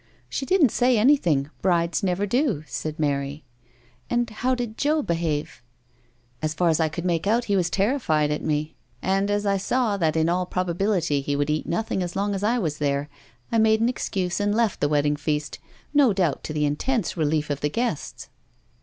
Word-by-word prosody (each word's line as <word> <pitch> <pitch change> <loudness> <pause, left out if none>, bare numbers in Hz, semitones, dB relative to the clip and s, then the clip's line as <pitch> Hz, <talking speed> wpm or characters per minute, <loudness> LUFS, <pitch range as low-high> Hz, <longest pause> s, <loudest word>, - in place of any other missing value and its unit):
"She 270 - -3
didn't 335 - +4
say 245 -1 +3
anything. 175 - +3
Brides 170 -1 +1
never 190 0 0
do," 235 - 0
said 155 0 -5
Mary. 140 -1 -2 0.3
" 120 -1 -34
And 240 0 +1
how 255 +4 0
did 240 -3 -4
Joe 300 +3 +1
behave? 165 - -2 0.3
" 120 0 -37
" 120 0 -38
As 155 0 -2
far 175 0 +2
as 160 0 +2
I 160 -1 +2
could 170 +3 -5
make 170 0 0
out 230 +3 +2
he 200 - +1
was 180 -2 +1
terri 220 +10 +1
fied 150 -6 +1
at 150 - -2
me, 155 +1 -1 0.3
and 195 +2 +1
as 205 0 0
I 200 -1 +2
saw 220 +1 0
that 160 -4 +1
in 160 0 +2
all 180 +1 0
probability 180 -4 0
he 140 +1 -2
would 145 +1 0
eat 155 - -2
nothing 195 +1 -1
as 175 -1 -4
long 200 +1 0
as 195 - -3
I 225 +4 +2
was 155 -9 -2
there, 140 0 -1 0.4
I 230 - +3
made 220 0 +4
an 230 +2 +2
excuse 185 -7 -2
and 205 0 +1
left 230 -2 +1
the 145 - +1
wedding 145 0 +2
feast, 150 -1 -2 0.3
no 280 -7 +5
doubt 180 -7 0
to 155 - -4
the 150 -1 +1
intense 200 - -1
relief 150 -2 0
of 140 - -3
the 150 - +1
guests." 230 - -3
175 Hz, 210 wpm, -24 LUFS, 150-215 Hz, 0.4 s, no